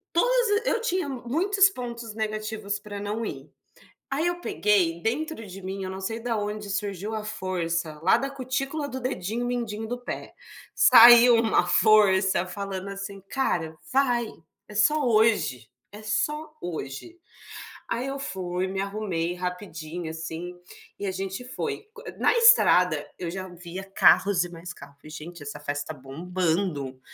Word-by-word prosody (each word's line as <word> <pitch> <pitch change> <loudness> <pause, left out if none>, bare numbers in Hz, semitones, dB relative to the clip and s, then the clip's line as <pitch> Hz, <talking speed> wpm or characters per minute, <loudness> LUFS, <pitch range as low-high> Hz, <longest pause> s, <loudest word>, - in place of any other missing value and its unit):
Todas 480 +1 +3
a - - +3
eu 465 - +1
tinha 370 -8 -1
muitos 340 +11 +2
pontos 235 - -7
negativos 215 -1 -3
pra 205 -1 -8
não 210 +3 -3
ir. - - -7 0.6
Aí 295 +5 0
eu 350 0 -1
peguei, 185 - +1
dentro 240 - -3
de 190 +1 -10
mim, 190 +1 -5
eu - - -4
não 190 - -6
sei 225 +4 -3
da 230 0 -2
onde 210 0 -4
surgiu 205 0 -3
a 215 - -3
força. 170 -6 -3
Lá - - +5
da 275 - -2
cutícula 275 +2 -3
do 260 -1 -5
dedinho 240 -1 -3
mindinho 225 -3 -3
do 245 +2 -3
pé. 245 - -7 0.4
Saiu 240 +1 +9
uma 225 -5 +3
força 190 -3 +4
falando 195 0 -5
assim: 195 0 -6
"Cara, 165 -12 -1 0.2
vai. 245 -4 +2 0.4
É 210 - -12
só 300 +7 +3
hoje. 215 - +2 0.2
É 210 - -10
só 300 +9 -1
hoje". 165 - -6 0.7
Aí 245 +3 -2
eu 275 - -3
fui. 185 -7 -3
Me 190 +1 -3
arrumei 195 -4 -2
rapidinho, 180 -2 -5
assim, 165 +2 -6 0.4
e 205 - -4
a - - 0
gente 195 +4 -5
foi. 255 - -5
Qu - - -12 0.2
na - - +3
estrada 475 +1 +6
eu 175 -2 -3
já 190 0 -5
via 175 +1 -8
carros 195 -1 +4
e 175 - -7
mais 175 +1 -8
carro. 140 0 -13
Falei: 155 +2 -14
"Gente, 160 +2 -9
essa 145 - -7
festa 145 +2 -4
tá - - -15
bombando". 160 -1 -2
205 Hz, 160 wpm, -26 LUFS, 180-245 Hz, 0.7 s, Saiu